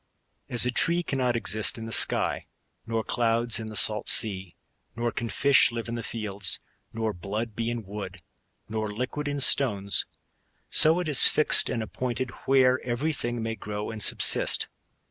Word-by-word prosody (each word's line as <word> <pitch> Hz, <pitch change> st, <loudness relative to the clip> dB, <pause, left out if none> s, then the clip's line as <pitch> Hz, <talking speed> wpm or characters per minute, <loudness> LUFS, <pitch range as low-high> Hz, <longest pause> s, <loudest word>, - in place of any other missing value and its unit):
As 120 Hz, -1 st, +7 dB
a 125 Hz, -, -1 dB
tree 170 Hz, +7 st, +2 dB
cannot 130 Hz, -5 st, -2 dB
exist 110 Hz, +3 st, +1 dB
in 115 Hz, -, -8 dB
the 115 Hz, -, -8 dB
sky,* -, -, +1 dB, 0.4 s
nor 115 Hz, -1 st, -3 dB
clouds 115 Hz, 0 st, +1 dB
in 110 Hz, -, -7 dB
the 110 Hz, -, -9 dB
salt 105 Hz, 0 st, +3 dB
sea; 95 Hz, -5 st, +2 dB, 0.4 s
nor 120 Hz, 0 st, -3 dB
can 120 Hz, 0 st, -5 dB
fish 140 Hz, 0 st, +2 dB
live 115 Hz, 0 st, -6 dB
in 115 Hz, -, -6 dB
the 120 Hz, -, -5 dB
fields, 105 Hz, -5 st, -1 dB, 0.3 s
nor 110 Hz, -1 st, -4 dB
blood 105 Hz, +5 st, -6 dB
be 115 Hz, +1 st, -3 dB
in 120 Hz, -1 st, -5 dB
wood, 95 Hz, -1 st, -9 dB, 0.5 s
nor 110 Hz, -1 st, -5 dB
liquid 130 Hz, +7 st, -5 dB
in 145 Hz, 0 st, -4 dB
stones; 105 Hz, -8 st, +1 dB, 0.6 s
so 160 Hz, +3 st, +4 dB
it 180 Hz, -, -4 dB
is 145 Hz, -4 st, +6 dB
fixed 155 Hz, -, +4 dB
and 115 Hz, -3 st, -3 dB
appointed 125 Hz, +2 st, -5 dB, 0.2 s
where 130 Hz, -1 st, +2 dB
every 130 Hz, +6 st, -3 dB
thing 120 Hz, -4 st, -5 dB
may 115 Hz, 0 st, -4 dB
grow 105 Hz, 0 st, -7 dB
and 110 Hz, -1 st, -7 dB
subsist. -, -, +3 dB
115 Hz, 170 wpm, -25 LUFS, 110-125 Hz, 0.6 s, As